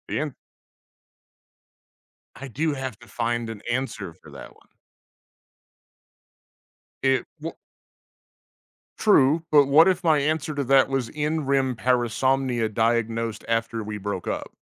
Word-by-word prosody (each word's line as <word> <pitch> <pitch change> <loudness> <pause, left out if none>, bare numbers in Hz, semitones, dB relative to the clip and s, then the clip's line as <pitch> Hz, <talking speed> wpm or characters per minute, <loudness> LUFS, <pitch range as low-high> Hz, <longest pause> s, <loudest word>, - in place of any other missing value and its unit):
And 150 -3 -2 2.0
I 135 - -8
do 150 +5 -1
have 130 -5 -5
to 120 - -16
find 120 +1 -2
an 110 -2 -7
answer 120 -8 -3
for - - -17
that - - -11
one. - - -25 2.3
It 135 -1 +2
w 165 +2 -5 1.4
True, 160 -6 +4
but 145 -2 +6
what 155 +5 +6
if 185 0 +1
my 160 -3 +4
answer 155 +1 -1
to 140 - -1
that 135 +1 +4
was 135 -4 -1
in 150 0 -2
REM 135 -2 +1
parasomnia 125 -1 0
diagnosed 115 0 0
after 115 0 -1
we 105 0 -5
broke 100 -2 -4
up? - - -4
130 Hz, 125 wpm, -24 LUFS, 115-145 Hz, 2.3 s, but